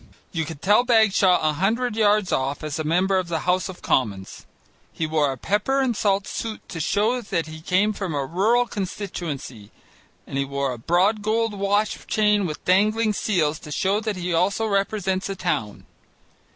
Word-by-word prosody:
You 165 Hz, -2 st, -2 dB
could 155 Hz, -2 st, -9 dB
tell 210 Hz, +4 st, +5 dB
Bagshaw 215 Hz, -6 st, +4 dB
a 155 Hz, -, +2 dB
hundred 220 Hz, +8 st, 0 dB
yards 210 Hz, -2 st, +2 dB
off 135 Hz, +2 st, -1 dB
as 155 Hz, 0 st, -4 dB
a -, -, -1 dB
member 185 Hz, +5 st, +2 dB
of 185 Hz, -, -4 dB
the 165 Hz, -2 st, -2 dB
House 180 Hz, +1 st, 0 dB
of 185 Hz, -, -10 dB
Commons. 100 Hz, -7 st, -1 dB, 0.4 s
He 160 Hz, -, -3 dB
wore 155 Hz, -3 st, +1 dB
a 135 Hz, -, -6 dB
pepper 210 Hz, -, 0 dB
and 260 Hz, -4 st, +1 dB
salt 200 Hz, -1 st, +1 dB
suit 225 Hz, -2 st, -5 dB
to 165 Hz, -, -6 dB
show 215 Hz, +9 st, +1 dB
that 175 Hz, -7 st, -2 dB
he 155 Hz, 0 st, -10 dB
came 190 Hz, +6 st, +2 dB
from 190 Hz, -6 st, -4 dB
a 140 Hz, -1 st, -1 dB
rural 215 Hz, -, +2 dB
constituency, 170 Hz, -, -5 dB, 0.6 s
and 135 Hz, -, -4 dB
he -, -, +2 dB
wore 140 Hz, 0 st, -2 dB
a 120 Hz, -, -9 dB
broad 185 Hz, -, +2 dB
gold 220 Hz, +1 st, 0 dB
watch 205 Hz, +1 st, -1 dB
chain 210 Hz, -2 st, +2 dB
with 150 Hz, -, -7 dB
dangling 215 Hz, +4 st, +3 dB
seals 160 Hz, -7 st, 0 dB
to 150 Hz, -, -11 dB
show 195 Hz, +7 st, +1 dB
that 215 Hz, -1 st, -3 dB
he 180 Hz, -1 st, -3 dB
also 195 Hz, +6 st, +1 dB
represents 195 Hz, -2 st, -1 dB
a 195 Hz, -, -3 dB
town. 105 Hz, -, -3 dB
190 Hz, 185 wpm, -23 LUFS, 160-210 Hz, 0.6 s, tell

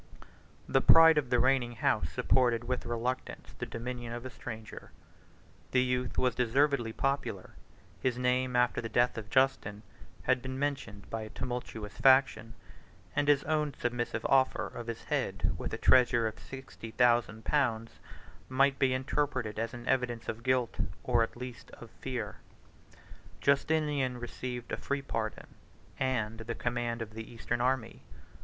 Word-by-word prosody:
The -, -, +3 dB
pride 165 Hz, -1 st, +8 dB
of 135 Hz, -4 st, -4 dB
the 125 Hz, -, +3 dB
reigning 125 Hz, -1 st, +2 dB
house 105 Hz, -7 st, +1 dB
supported, 120 Hz, +7 st, +2 dB
with 125 Hz, +1 st, -3 dB
reluctance, 120 Hz, +2 st, -3 dB
the -, -, -3 dB
dominion 120 Hz, 0 st, -5 dB
of 120 Hz, +1 st, -6 dB
a 130 Hz, -, -6 dB
stranger: 110 Hz, -3 st, -8 dB, 0.8 s
the 125 Hz, -1 st, +3 dB
youth 125 Hz, 0 st, -1 dB
was 125 Hz, -2 st, +2 dB
deservedly 125 Hz, 0 st, +2 dB
popular; 135 Hz, +4 st, -2 dB, 0.5 s
his 125 Hz, -2 st, 0 dB
name, 125 Hz, 0 st, +1 dB
after 125 Hz, 0 st, +2 dB
the 115 Hz, -, -5 dB
death 120 Hz, +1 st, +2 dB
of 110 Hz, -2 st, -6 dB
Justin, 120 Hz, -6 st, +1 dB, 0.4 s
had 130 Hz, 0 st, +2 dB
been 130 Hz, +1 st, -5 dB
mentioned 135 Hz, -8 st, -3 dB
by 115 Hz, -, -2 dB
a 110 Hz, -, -7 dB
tumultuous 115 Hz, -3 st, -5 dB
faction; 130 Hz, -4 st, +4 dB, 0.6 s
and 145 Hz, -, +1 dB
his 145 Hz, -1 st, +4 dB
own 150 Hz, -3 st, 0 dB
submissive 120 Hz, -2 st, -2 dB
offer 130 Hz, -1 st, +3 dB
of 120 Hz, -1 st, -7 dB
his 115 Hz, -1 st, -5 dB
head -, -, -1 dB
with -, -, -5 dB
a -, -, -3 dB
treasure 120 Hz, -2 st, +4 dB
of 110 Hz, -, -6 dB
sixty 130 Hz, -4 st, -9 dB
thousand 120 Hz, -2 st, +2 dB
pounds, 115 Hz, -6 st, 0 dB, 0.5 s
might 135 Hz, +1 st, +3 dB
be 130 Hz, -2 st, +3 dB
interpreted 130 Hz, -5 st, -1 dB
as 115 Hz, 0 st, -2 dB
an 120 Hz, 0 st, -9 dB
evidence 120 Hz, -3 st, 0 dB
of 110 Hz, -, -4 dB
guilt, 130 Hz, -2 st, 0 dB, 0.2 s
or 120 Hz, -2 st, +2 dB
at 115 Hz, -, -1 dB
least 125 Hz, -2 st, -8 dB
of -, -, -12 dB
fear. -, -, -5 dB, 1.0 s
Justinian 140 Hz, -3 st, +1 dB
received 120 Hz, 0 st, -6 dB
a -, -, -1 dB
free 140 Hz, 0 st, -2 dB
pardon, 110 Hz, -5 st, -3 dB, 0.5 s
and 115 Hz, -4 st, -1 dB
the 115 Hz, +1 st, -5 dB
command 120 Hz, -1 st, -2 dB
of 110 Hz, -1 st, -11 dB
the 110 Hz, 0 st, -8 dB
eastern 120 Hz, +1 st, -3 dB
army. 125 Hz, -2 st, 0 dB
125 Hz, 155 wpm, -31 LUFS, 115-130 Hz, 1.0 s, pride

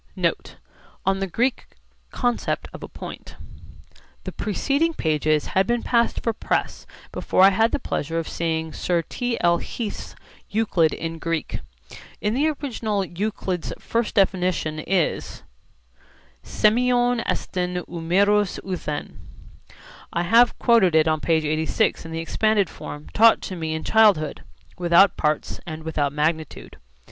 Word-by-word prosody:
NOTE: -, -, -2 dB, 0.5 s
ON 195 Hz, 0 st, +1 dB
THE 195 Hz, -, -1 dB
GREEK 240 Hz, +8 st, -1 dB, 0.4 s
CONCEPT 245 Hz, -1 st, -1 dB
OF -, -, -9 dB
A -, -, -7 dB
POINT -, -, -9 dB, 0.9 s
The -, -, -5 dB
preceding 285 Hz, -, 0 dB
pages 155 Hz, -1 st, +1 dB
had 190 Hz, +1 st, +3 dB
been 240 Hz, 0 st, 0 dB
passed 235 Hz, -1 st, +1 dB
for 230 Hz, -, 0 dB
press -, -, -2 dB, 0.2 s
before 185 Hz, -, +2 dB
I 195 Hz, -, +8 dB
had 225 Hz, +4 st, +2 dB
the -, -, +1 dB
pleasure 165 Hz, -, -3 dB
of 165 Hz, -, -2 dB
seeing 160 Hz, -1 st, -2 dB
Sir 175 Hz, -2 st, 0 dB
T. 245 Hz, +7 st, -3 dB
L. 170 Hz, 0 st, +3 dB
Heath's 225 Hz, -4 st, -6 dB, 0.3 s
Euclid 195 Hz, -7 st, +2 dB
in 165 Hz, 0 st, -5 dB
Greek. 165 Hz, -1 st, -3 dB, 0.6 s
In 210 Hz, +1 st, -1 dB
the 285 Hz, +6 st, +2 dB
original 230 Hz, -9 st, -2 dB
Euclid's 185 Hz, -1 st, -3 dB
first 230 Hz, -1 st, -2 dB
definition 180 Hz, -5 st, +1 dB
is 175 Hz, +1 st, -1 dB, 1.0 s
σημειον 245 Hz, +1 st, +2 dB
εστιν, 180 Hz, -1 st, -2 dB
ου 170 Hz, -, -6 dB
μερος 200 Hz, +4 st, +2 dB
ουθεν. 170 Hz, -6 st, -5 dB, 0.9 s
I 170 Hz, -, -1 dB
have 230 Hz, +7 st, +4 dB
quoted 225 Hz, -9 st, +4 dB
it 160 Hz, 0 st, +4 dB
on 155 Hz, 0 st, +2 dB
p. 165 Hz, -, 0 dB
86 160 Hz, +6 st, 0 dB
in 165 Hz, -, -8 dB
the 160 Hz, -, -4 dB
expanded 205 Hz, +4 st, +1 dB
form 150 Hz, 0 st, -9 dB
taught 225 Hz, +1 st, +6 dB
to 185 Hz, -, -5 dB
me 160 Hz, -2 st, -3 dB
in 160 Hz, -, -4 dB
childhood, 205 Hz, -10 st, +3 dB, 0.4 s
'without 175 Hz, +2 st, +5 dB
parts 150 Hz, 0 st, -1 dB
and 160 Hz, -1 st, -6 dB
without 150 Hz, -3 st, -1 dB
magnitude.' 155 Hz, +1 st, -2 dB
185 Hz, 140 wpm, -23 LUFS, 160-220 Hz, 1.0 s, I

